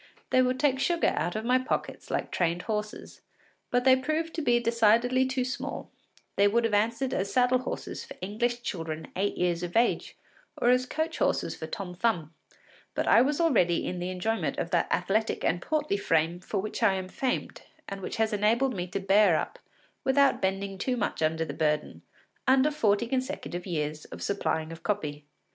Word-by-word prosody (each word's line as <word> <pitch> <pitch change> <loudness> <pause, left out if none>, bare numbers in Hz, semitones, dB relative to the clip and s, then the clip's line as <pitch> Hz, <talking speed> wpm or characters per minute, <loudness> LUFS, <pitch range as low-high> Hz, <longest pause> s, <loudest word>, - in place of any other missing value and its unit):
They 255 - +5
would 255 0 +1
take 270 -3 +2
sugar 340 +4 +2
out 175 - -1
of 215 +1 -3
my 250 +1 +4
pockets 255 - -3
like - - -2
trained 175 0 0
horses. 210 -1 -5 0.5
But 245 0 +1
they 260 0 +7
proved 310 +5 -2
to 330 - -2
be 240 -5 +3
decidedly 235 +2 +3
too 260 -1 -1
small; 255 - -5 0.5
they 200 - +5
would 235 +3 +2
have 225 -2 0
answered 230 +5 +1
as 195 +1 -1
saddle 250 +2 +3
horses 255 - -5
for - - -10
English 240 +5 -2
children 160 -6 -4
eight 200 +2 -1
years 175 -1 0
of 175 +3 -2
age, 235 +1 +1 0.4
or 240 - +2
as 250 0 +2
coach 315 +3 -2
horses - - 0
for - - -6
Tom 185 -3 -5
Thumb, 175 -5 -1 0.6
but - - -1
I 230 - +7
was 285 +4 +1
already 195 - +3
in 180 - -3
the 180 +1 -3
enjoyment 185 +5 -1
of - - -3
that - - +1
athletic 220 +3 0
and 175 +1 +1
portly 300 - 0
frame 165 -2 +1
for 190 +3 -4
which 215 +4 -4
I 205 -4 +4
am 185 -1 -4
famed, 255 +6 -3 0.3
and 195 0 -6
which - - -4
has 220 0 +1
enabled 230 +6 +2
me 180 -3 -3
to 190 +2 -3
bear 195 -2 +4
up, - - -3 0.4
without 275 +1 +3
bending 195 0 -2
too 250 +2 -1
much 205 - -2
under 160 +1 +1
the 145 - -5
burden, 150 -1 -1 0.5
under 265 +3 +5
forty 225 -6 +2
consecutive 255 -8 -3
years 155 -3 -3
of - - -9
supplying 160 -5 -1
of 165 - -9
copy. 150 -8 -3
215 Hz, 190 wpm, -28 LUFS, 180-255 Hz, 0.6 s, they